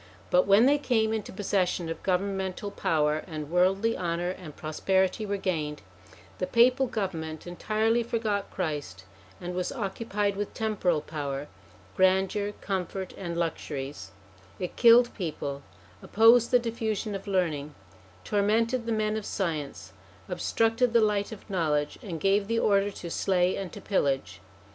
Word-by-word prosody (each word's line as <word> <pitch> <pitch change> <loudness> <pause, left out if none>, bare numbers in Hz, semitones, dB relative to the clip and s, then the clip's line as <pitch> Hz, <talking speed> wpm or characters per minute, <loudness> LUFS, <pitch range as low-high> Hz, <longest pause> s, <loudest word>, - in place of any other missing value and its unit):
But 180 +2 +4
when 200 +4 +6
they 290 +2 +4
came 220 -5 +1
into 220 -2 -3
possession 185 -3 0
of 165 - -5
governmental 190 +1 -1
power, 155 -4 +1
and 155 -3 -6
worldly 195 +5 +2
honour 175 0 -1
and 175 -5 -9
prosperity 190 +6 0
were 200 0 -1
gained, 155 - -2 0.6
the 185 - -1
Papal 255 +3 +4
government 165 -8 -4
entirely 215 +6 0
forgot 220 -3 -1
Christ, 145 - -4 0.4
and 175 0 -5
was 180 0 -2
occupied 205 -3 -2
with 205 0 -4
temporal 200 -8 0
power, 145 -2 -4 0.5
grandeur, 190 +2 +2
comfort, 190 -1 -3
and 170 -3 -5
luxuries; 145 - -4 0.5
it 180 - -5
killed 240 0 +6
people, 145 -6 -4 0.4
opposed 230 +2 +5
the 250 - +6
diffusion 225 -3 -2
of 195 +1 -6
learning, 155 -7 -1 0.5
tormented 225 - +1
the - - 0
men 215 -1 0
of 220 - -3
science, 150 - -4 0.3
obstructed 225 +6 +1
the 235 - +6
light 210 -1 +1
of 220 - -10
knowledge, 155 -7 0
and 170 -6 -5
gave 195 +2 +2
the 230 +1 0
order 200 -2 +3
to 175 -4 -8
slay 180 0 +1
and 190 -3 -5
to - - -9
pillage. 135 - -1
190 Hz, 145 wpm, -28 LUFS, 165-215 Hz, 0.6 s, when